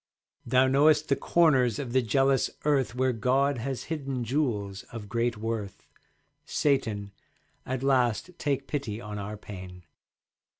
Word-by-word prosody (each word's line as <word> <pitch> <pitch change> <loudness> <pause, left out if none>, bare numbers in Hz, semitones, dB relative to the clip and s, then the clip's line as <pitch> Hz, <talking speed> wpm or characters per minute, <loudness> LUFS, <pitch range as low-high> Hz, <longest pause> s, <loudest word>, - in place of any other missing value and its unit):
Thou 130 0 +4
knowest 150 +3 +4
the 140 - +4
corners 135 -11 +3
of 130 -4 -5
the 130 - +4
jealous 135 +3 +2 0.2
Earth 135 -4 +2
Where 130 0 +1
God 130 +4 +1
has 130 +2 -3
hidden 135 -5 -3
jewels 110 -7 -1
of 115 -3 -7
great 115 +1 -1
worth. 110 -3 -4 0.6
Satan, 110 -9 0 0.6
at 130 0 -2
last 130 +3 +2
take 140 -2 -1
pity 130 -8 -3
on 105 -2 -6
our 105 +1 -5
pain. 90 -3 -10
125 Hz, 135 wpm, -28 LUFS, 105-140 Hz, 0.6 s, Thou